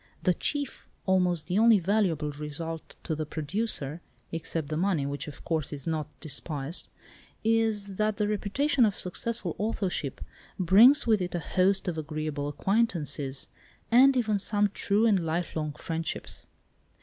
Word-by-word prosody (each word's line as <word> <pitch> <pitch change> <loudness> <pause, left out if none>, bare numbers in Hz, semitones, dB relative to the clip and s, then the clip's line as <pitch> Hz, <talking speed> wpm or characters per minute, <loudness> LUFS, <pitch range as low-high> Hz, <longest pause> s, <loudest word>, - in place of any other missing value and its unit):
The 180 - +4
chief, 285 - -2 0.2
almost 180 -4 +2
the 180 +6 +1
only 225 -1 +7
valuable 180 -6 +1
result 150 +2 -6
to 160 - -2
the 155 0 -2
producer 160 -1 -2 0.3
(except 165 -2 -3
the 155 - -2
money, 170 -4 +1
which, 140 +2 -4
of 145 - -10
course, 160 -4 -1
is 140 -3 -6
not 160 -3 -1
despised) 150 0 -4 0.5
is, 220 -3 +1
that 215 -1 +1
the 210 - +1
reputation 245 +7 +1
of 210 -3 +2
successful 185 0 -3
authorship 195 - -2 0.4
brings 215 - +6
with 220 -4 +3
it 180 -1 -3
a - - 0
host 190 +4 +1
of 165 -3 -1
agreeable 155 -1 -3
acquaintances, 145 - -1 0.4
and 260 +3 +7
even 215 -4 +1
some 205 +1 +2
true 205 +3 +2
and 210 -4 +4
lifelong 160 -2 -2
friendships." 165 +2 -5
180 Hz, 145 wpm, -28 LUFS, 155-210 Hz, 0.5 s, only